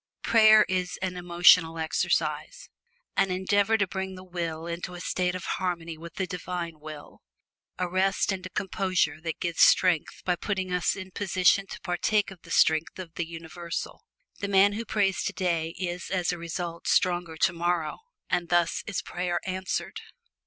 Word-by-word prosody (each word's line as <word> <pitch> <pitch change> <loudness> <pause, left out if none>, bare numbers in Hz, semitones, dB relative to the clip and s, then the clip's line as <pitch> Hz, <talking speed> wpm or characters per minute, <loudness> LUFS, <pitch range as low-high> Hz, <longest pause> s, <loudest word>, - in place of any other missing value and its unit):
Prayer 215 -1 +7
is 185 -1 -1
an 185 -1 -2
emotional 175 -1 +5
exercise; 160 - -1 0.5
an 195 - +2
endeavor 200 +4 +2
to 200 - +2
bring 190 0 -4
the 185 - -10
will 170 -3 -4
into 170 +1 -5
a - - -8
state 180 0 -1
of 185 - -5
harmony 170 -3 -3
with 165 +1 -11
the 190 - -1
Divine 180 -3 -5
Will; 155 -1 -10 0.6
a 180 - -1
rest 190 +3 +1
and 190 -1 -4
a 185 - -6
composure 185 -5 -1
that 165 -1 -4
gives 170 -2 -1
strength 180 -4 +4
by 180 - +2
putting 190 -1 -3
us 180 -1 +1
in 190 -1 -8
position 195 0 +2
to - - -8
partake 195 +4 0
of 185 -3 -13
the 170 - -16
strength 160 0 +3
of 180 -3 -8
the 170 -1 -3
Universal. 165 +1 -6 0.4
The 200 - -2
man 200 +1 +5
who 225 +3 -4
prays 195 -4 +1
today 165 -3 -1
is 175 -1 -4
as 180 -2 0
a 175 - -4
result 170 0 -5
stronger 175 -4 +1
tomorrow, 170 -2 0 0.3
and 175 -1 -1
thus 175 -1 +2
is 200 - -2
prayer 175 0 -2
answered. 185 0 -3
180 Hz, 165 wpm, -27 LUFS, 170-190 Hz, 0.6 s, Prayer